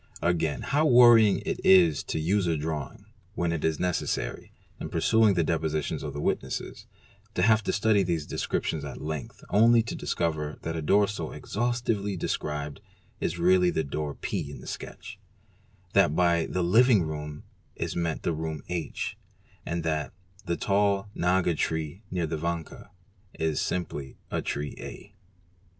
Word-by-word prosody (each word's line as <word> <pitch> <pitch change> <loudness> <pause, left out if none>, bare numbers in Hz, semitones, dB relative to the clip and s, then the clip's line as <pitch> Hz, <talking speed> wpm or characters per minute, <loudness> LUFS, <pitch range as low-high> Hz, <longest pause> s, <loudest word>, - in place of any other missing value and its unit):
Again 80 -3 0
how 150 +3 +2
worrying 120 -5 +7
it - - -2
is 85 -6 +6
to - - -3
use 90 +4 +1
a 80 -2 +1
drawing, 75 -2 -4 0.3
when 85 -1 0
it 85 -2 -2
is 80 -2 +1
necessary, 90 -1 -2 0.3
in - - -5
perusing 110 -3 +3
the 85 - +2
depositions 80 -2 -1
of - - -5
the 70 - -5
witnesses, - - -3 0.5
to 90 - +1
have 110 +1 +4
to - - +1
study 105 -1 +3
these 85 -5 -1
descriptions 80 -3 -2
at 70 - -7
length, 75 -2 -6
only 115 +2 +5
to 115 - -5
discover 75 -3 -2
hat 80 - -3
a 80 - -2
door 100 +7 +4
so 85 -6 -4
exhaustively 115 -4 -1
described 75 -3 -3 0.4
is 85 - -2
really 90 +1 +4
the 80 - 0
door 75 0 -4
P - - -3
in - - -9
the - - -12
sketch, 100 0 -8 0.7
th 100 - +6
at 75 - -3
by 85 -2 +3
the 90 - -1
"living 110 +2 +5
room'"' 75 -1 -5 0.3
is - - -3
meant 85 -2 -2
the 85 - 0
room 80 -1 -4
H, 85 -3 -3 0.5
and 85 0 -2
that 75 -4 -1 0.3
"the 85 - 0
tall 100 0 +1
"aga 90 0 +2
tree 80 +3 -2
near 90 -2 -1
the 80 0 -3
vanka'' 85 0 -4 0.5
is 80 -2 0
simply 75 -6 -3
the - - -1
tree 75 0 -3
A. 100 - -9
85 Hz, 165 wpm, -27 LUFS, 80-100 Hz, 0.7 s, worrying